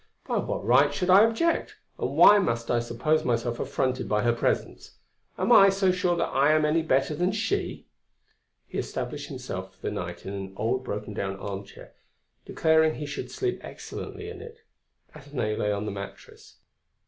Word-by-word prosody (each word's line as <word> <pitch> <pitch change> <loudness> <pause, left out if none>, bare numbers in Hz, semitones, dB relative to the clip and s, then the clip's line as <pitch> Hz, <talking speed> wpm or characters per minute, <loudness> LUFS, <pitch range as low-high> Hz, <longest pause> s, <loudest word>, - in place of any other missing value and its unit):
"By - - -1
what - - -3
right - - +5
should 180 -1 0
I 195 +3 +8
object? 330 +10 0 0.2
and - - -3
why 205 0 +8
must 115 -11 -1
I 120 - +2
suppose 120 +7 0
myself 120 -1 -1
affronted 130 -1 -1
by 105 0 +1
her 120 0 +3
presence? 115 - -2 0.4
am 190 +6 0
I 195 -4 +8
so 195 -1 +2
sure 180 -1 +1
that 170 - 0
I 140 +3 +4
am 155 0 +3
any 155 +2 +2
better 135 -1 +1
than 180 +5 0
she?" 220 +2 -2 0.8
He - - -5
established - - -4
himself - - -7
for - - -33
the - - -2
night - - -6
in 95 - -5
an 95 -1 -6
old 125 +4 -1
broken 105 -2 -5
down 95 -1 -3
armchair, 100 0 -8 0.5
declaring 160 -1 +3
he 150 - -5
should 145 - -6
sleep 380 -2 -2
excellently 420 - -8
in 435 -2 -8
it. 460 0 -12 0.5
Athenaïs 135 -7 -4
lay 105 - +1
on 100 +1 -2
the 105 - -3
mattress. 100 -10 -10
145 Hz, 180 wpm, -26 LUFS, 115-185 Hz, 0.8 s, I